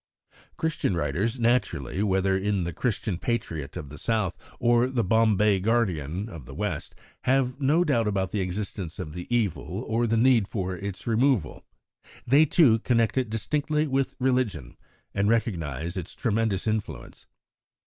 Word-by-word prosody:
Christian 160 - -1
writers 110 +8 -1
naturally, 115 - +1
whether 95 -1 +2
in 100 -1 0
the 85 0 -3
Christian 105 -3 -2
Patriot 80 - -3
of 75 - -7
the 75 - -10
South 110 -6 0 0.2
or 120 0 +3
the 130 -3 0
Bombay 105 -1 +3
Guardian 95 -5 0
of 80 - -10
the 65 - -9
West, - - -3 0.3
have 130 +1 +1
no 150 +6 +3
doubt 120 -9 +1
about 95 -2 -1
the 105 - -1
existence 90 -2 -4
of 80 -5 -6
the 90 +1 -7
evil 110 -3 -1
or 115 +2 +1
the 115 +1 +1
need 115 -3 +4
for 95 -4 -3
its 100 +1 -6
removal. 115 - +1 0.6
They, 140 +6 +5
too, 130 -8 +5
connect 115 -1 +1
it 130 -4 0
distinctly 150 +7 0
with 135 -2 -1
religion, 125 - 0 0.4
and 100 +1 +1
recognise 85 - -1
its 90 -4 -6
tremendous 110 -4 0
influence. 110 -1 -4
110 Hz, 150 wpm, -26 LUFS, 95-120 Hz, 0.6 s, They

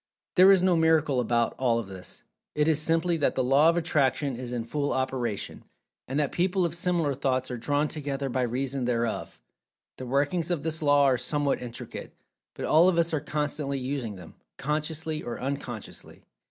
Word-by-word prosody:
There 185 +2 +8
is 190 -2 +5
no 185 -2 +4
"miracle" 160 -4 +3
about 120 -1 +1
all 120 -3 +2
of 115 - -2
this—it 95 - -6
is 155 -2 +3
simply 165 +2 +1
that 150 - +1
the 130 - +1
Law 140 +5 +5
of 170 - +1
Attraction 140 -5 +1
is 125 0 -6
in 120 -2 -2
full 145 +4 -2
operation, 130 -5 -3 0.4
and 135 +3 -1
that 145 -2 +1
people 185 +1 +1
of 165 - -2
similar 170 -4 0
thoughts 130 -1 -1
are 125 - -3
drawn 145 +5 +1
together 140 -3 -3
by 130 0 -1
reason 130 +2 -1
thereof. 120 -2 -2 0.6
The 130 - -6
workings 145 +6 0
of 170 -5 -1
this 160 0 -2
Law 145 -1 +4
are 130 -3 +3
somewhat 145 +2 0
intricate, 120 -2 -8 0.4
but - - -4
all 165 +4 +5
of 175 - 0
us 170 0 +2
are 155 - +2
constantly 145 -1 -2
using 130 -5 -3
them, 90 -3 -12 0.2
consciously 155 +1 -2
or 120 - -5
unconsciously. 130 -5 -6
140 Hz, 180 wpm, -27 LUFS, 125-160 Hz, 0.6 s, There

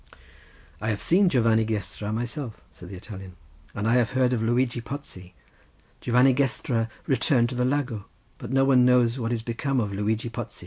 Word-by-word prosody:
"I 110 - -1
have 105 -2 -1
seen 185 +2 +3
Giovanni 115 -5 +3
Gestra 105 -1 -4
myself," 120 +2 -4
said 90 - -12
the 95 - -8
Italian, 95 -1 -10 0.4
"and 105 +2 -2
I 120 +2 +4
have 120 -2 +1
heard 130 -1 +2
of 115 - 0
Luigi 120 +1 +1
Pozzi. 95 - -9 0.6
Giovanni 125 +2 +4
Gestra 125 -4 0 0.2
returned 125 -2 +2
to 125 - -5
the 125 0 +1
Lago—but 125 -4 -4
no 135 0 +3
one 130 -2 +5
knows 125 0 +3
what 115 -1 -2
is 115 -2 -2
become 130 +3 -1
of 105 -4 -2
Luigi 110 +3 -1
Pozzi." - - -7
120 Hz, 175 wpm, -25 LUFS, 110-130 Hz, 0.6 s, one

